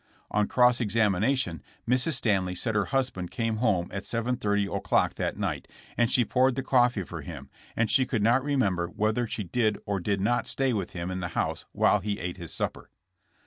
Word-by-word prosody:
On 105 0 +2
cross 125 0 +4
examination 105 - +1 0.3
Mrs. 125 +6 +2
Stanley 95 -7 +1
said 110 +5 -2
her 105 -1 +1
husband 125 -10 -1
came 115 -1 -2
home 105 -7 +1
at 95 - -3
7:30 105 -4 -1
o'clock - - +1
that - - -3
night, - - -3 0.3
and 120 -1 +2
she 120 - +3
poured 130 +1 +2
the 135 - -2
coffee 125 -5 +3
for 85 -2 -7
him, 70 -3 -9 0.2
and 115 - +2
she 130 +3 +3
could 110 -4 -1
not 120 +4 +3
remember 105 -12 +1
whether 110 +5 0
she 110 - -3
did 110 +3 0
or 100 -1 -1
did 100 +2 -1
not 120 +5 +1
stay 135 -2 0
with 100 -5 -3
him 90 +1 -4
in 95 - -3
the 90 - -3
house - - -1
while - - +3
he 105 -1 -3
ate 90 +1 -4
his 85 -3 -6
supper. - - -3
110 Hz, 195 wpm, -27 LUFS, 95-125 Hz, 0.3 s, cross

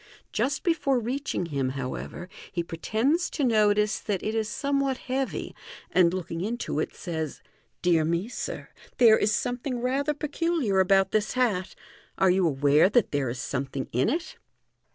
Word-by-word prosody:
Just 270 0 -1
before 285 -7 +2
reaching 245 -4 -2
him, 140 -5 -1
however, 135 +6 -5 0.2
he 170 -2 -2
pre 165 -1 -8
tends 275 - +1
to 295 - -2
notice 210 -3 +3
that 200 -4 -3
it 215 - -1
ir 225 -1 +1
somewhat 275 +4 -1
heavy, 265 +1 -3 0.4
and 175 -2 +5
looking 170 -2 -4
into 220 -6 -2
it, - - -3
says. 160 -5 -4 0.2
" 110 -1 -43
Dear 170 -3 +4
me, 170 +5 0
sir, 250 - -5 0.3
there 230 -4 +7
is 210 - +2
something 245 +4 -1
rather 275 +4 0
peculiar 300 - 0
about 190 0 +4
this 215 -1 0
hat. 220 -8 0 0.4
Are 190 -1 +4
you 185 -1 +3
aware 145 +3 +4
that 230 +1 +2
there 140 -3 0
is 120 +1 -5
something 135 +1 -3
in 125 - +2
it 325 +6 -3
210 Hz, 165 wpm, -27 LUFS, 170-255 Hz, 0.4 s, there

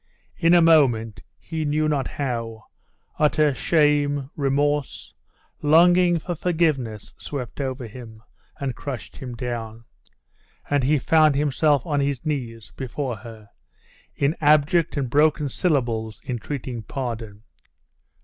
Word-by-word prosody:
In 165 +1 +4
a 170 - +6
moment, 120 -11 +3 0.2
he 160 -1 -5
knew 155 +1 +1
not 140 -4 0
how, 115 -5 -4 0.6
utter 150 -1 +3
shame, 145 -2 +1
remorse, 145 0 -1 0.5
longing 175 +3 +5
for 175 +2 -4
forgiveness, 155 - -1
swept 135 -1 -6
over 130 -2 -4
him, 110 -1 -11 0.4
and 135 -3 -3
crushed 135 -5 -7
him 125 -2 -7
down; 115 -2 -5 0.8
and 145 -2 +1
he 150 +4 +3
found 155 +1 +4
himself 145 0 +2
on 145 -3 0
his 140 -1 -2
knees 120 -7 -4
before 130 -1 -4
her, 110 -2 -12 0.6
in 140 +3 +1
abject 155 +2 +3
and 135 -2 -1
broken 150 0 +3
syllables 120 - -1
entreating 125 -1 -4
pardon. 110 -3 -6
140 Hz, 120 wpm, -23 LUFS, 120-150 Hz, 0.8 s, a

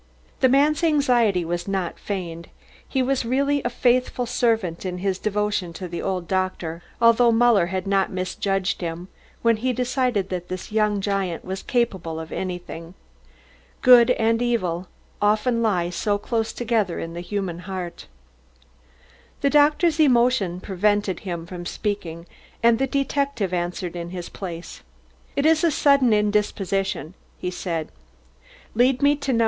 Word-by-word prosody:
The 260 - +4
man's 290 +4 +3
anxiety 245 - +3
was 175 +3 -3
not 190 -3 -2
feigned. 170 -4 -5 0.4
He 265 -2 +1
was 265 0 0
really 280 +4 +1
a 240 - -1
faithful 245 0 +1
servant 225 -8 0
in 180 -1 -3
his 190 0 -1
devotion 210 -4 -1
to 180 +2 -6
the 170 0 -5
old 185 -3 -2
doctor, 185 -3 -2 0.2
although 230 0 +5
Muller 230 -6 +4
had 185 +1 -3
not 195 -1 +1
misjudged 190 +1 -1
him 170 +2 -5 0.3
when 230 -1 +4
he 255 +4 0
decided 250 -5 0
that 180 -1 -4
this 185 +2 -6
young 210 -2 +1
giant 195 -4 -2
was 190 +1 -4
capable 190 -10 -1
of 160 0 -8
anything. 175 -2 -6 0.9
Good 245 -2 +8
and 230 -1 +2
evil 185 -8 -1 0.3
often 215 +3 +2
lie 180 -6 +1
so 205 +4 0
close 225 +1 -2
together 220 -7 -1
in 165 0 -5
the 170 - -5
human 180 -2 -3
heart. 180 -1 -6 1.3
The 280 - +2
doctor's 300 +2 +4
emotion 240 - +3
prevented 205 -1 0
him 170 -4 -5
from 175 0 -7
speaking, 175 -6 -4 0.4
and 230 0 +5
the 270 - +1
detective 275 -7 -1
answered 175 0 -3
in 170 0 -5
his 175 -1 -6
place. 175 -3 -7 0.5
"It 280 - +1
is 320 0 +4
a 335 - +5
sudden 280 -4 +4
indisposition," 195 -4 0 0.2
he 180 - -3
said. 165 -3 -4 0.8
"Lead 250 +4 +2
me 285 +1 +5
to 280 -2 -1
No. 230 - +2
205 Hz, 150 wpm, -23 LUFS, 180-245 Hz, 1.3 s, Good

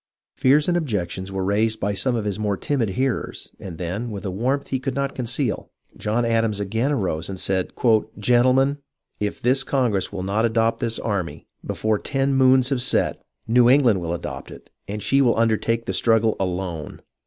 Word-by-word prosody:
Fears 140 +3 +3
and 175 - +2
objections 95 - -2
were 95 -1 -2
raised 110 +3 +1
by 100 +1 -1
some 125 +5 +1
of 110 -3 -2
his 105 0 -2
more 105 -2 -1
timid 125 -4 -1
hearers, 125 +4 -2
and 90 -4 -8
then, 95 +8 -4
with 105 -2 -6
a 95 - -2
warmth 130 +9 -1
he 130 - -1
could 130 0 -3
not 140 0 -1
conceal, 125 -1 -2 0.3
John 115 +3 -1
Adams 115 -2 +1
again 110 +7 -1
arose 95 - -1
and 95 -1 -4
said: 95 -1 0 0.3
" 110 +1 -9
Gentlemen, 130 +5 +3 0.4
if 105 -1 -2
this 130 +3 +2
congress 120 -10 0
will 95 -2 -4
not 100 +4 0
adopt 115 0 +1
this 115 -3 -1
army, 100 -6 -3 0.2
before 110 -1 -1
ten 135 -1 0
moons 130 -1 +4
have 135 -3 0
set, 125 - +1 0.3
New 120 +1 +5
England 125 -8 +4
will 85 0 -2
adopt 85 - -7
it, - - -13 0.2
and 105 +1 -5
she 135 0 +3
will 120 -4 +3
undertake 115 +1 +1
the - - -2
struggle 115 -1 +3
alone 90 -4 -4
115 Hz, 190 wpm, -23 LUFS, 100-130 Hz, 0.4 s, New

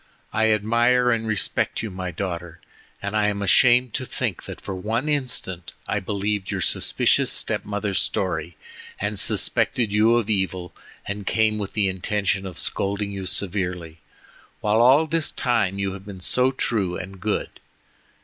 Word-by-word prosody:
I 110 0 +3
admire 120 +4 +3
and 115 -1 0
respect 110 0 0
you, 110 - -4
my 90 0 -4
daughter, 85 -2 -5 0.4
and 100 +1 -3
I 105 -1 +3
am 100 -1 -1
ashamed 120 +3 +5
to 130 - -2
think 115 -8 -3
that - - -8
for - - -6
one 110 +9 -2
instant 125 - -2
I 105 - 0
believed 100 0 -2
your - - -2
suspicious - - +2
step - - -2
mother's 100 -1 -1
story 85 -3 -2 0.4
and 105 0 -1
suspected 115 -5 +2
you 110 +3 +4
of 120 -3 +1
evil, 95 -4 -2 0.3
and 100 0 -5
came 110 -1 +2
with 100 -2 -4
the 105 -2 +1
intention 95 +1 -1
of 90 -3 -8
scolding 100 +1 -1
you 95 -2 -5
severely, 90 -4 -2 0.6
while 110 +2 +2
all 135 +6 +6
this 160 0 0
time 110 -6 0
you 100 -1 -1
have 100 +1 -10
been 100 -2 -8
so 125 +8 +2
true 100 -9 -1
and 95 +1 -8
good. 105 +1 -2
105 Hz, 160 wpm, -24 LUFS, 95-115 Hz, 0.6 s, all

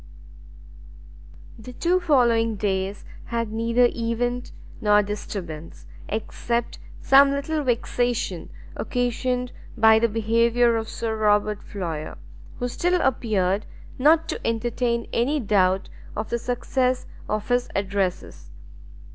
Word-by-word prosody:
The 250 +3 -10
two 350 +8 +1
following 235 -9 +3
days 195 -1 -2 0.2
had 230 -2 -2
neither 230 +2 +3
event 240 +1 -2 0.3
nor 210 0 +4
disturbance, 180 -6 -6 0.2
except 235 +2 -2 0.2
some 275 +1 +7
little 285 +2 -1
vexation 240 -6 -1 0.3
occasioned 250 0 -1 0.3
by 220 0 +6
the 230 +1 +2
behaviour 230 +2 +2
of 225 -1 -2
Sir 225 -1 -3
Robert 210 -1 +2
Floyer, 165 -6 -5 0.4
who 245 - -2
still 355 +8 +1
appeared 210 - 0 0.3
not 315 +4 +4
to - - -3
entertain 235 +1 -1
any 275 +6 +1
doubt 195 -4 +2 0.3
of 215 +1 -4
the 235 - 0
success 250 +1 0 0.2
of 215 +1 -2
his 245 0 +1
addresses. 195 - -2
230 Hz, 110 wpm, -24 LUFS, 210-245 Hz, 0.4 s, some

